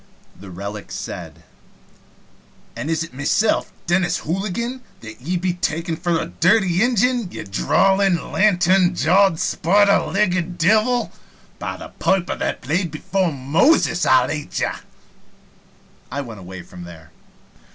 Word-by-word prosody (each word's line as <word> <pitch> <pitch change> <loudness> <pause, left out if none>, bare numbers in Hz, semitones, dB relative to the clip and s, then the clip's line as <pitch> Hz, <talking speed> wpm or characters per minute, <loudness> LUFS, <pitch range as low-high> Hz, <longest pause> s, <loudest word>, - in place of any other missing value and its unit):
The 100 - -12
relic 100 +3 -7
said: - - -7 1.3
"An' 150 - -5
is 160 0 0
it 165 - -10
mesilf, 145 +11 +1
Dennis 175 -1 +1
Hooligan, 215 +9 -3 0.2
that 110 +1 -11
ye'd 175 +6 -2
be 180 -1 0
takon' 165 -1 -2
for 170 0 0
a - - -2
dirty 185 -1 +2
Injin, 245 -2 +2
ye - - -6
drawlin', 190 - +1
lantern 185 -2 +3
jawed, 185 +1 +3
spider 200 +3 +3
legged 180 -3 -1
divil! 220 +8 +2 0.5
By - - -4
the - - -9
piper 190 -2 +1
that - - -3
played 170 +7 -1
before 175 +4 -1
Moses, 160 - +2
I'll 130 -1 +4
ate 150 -1 -4
ye!" - - +1 1.4
I 140 - -2
went 115 -6 -9
away 95 -1 -9
from 90 0 -11
there. 80 -3 -13
175 Hz, 130 wpm, -21 LUFS, 145-195 Hz, 1.4 s, I'll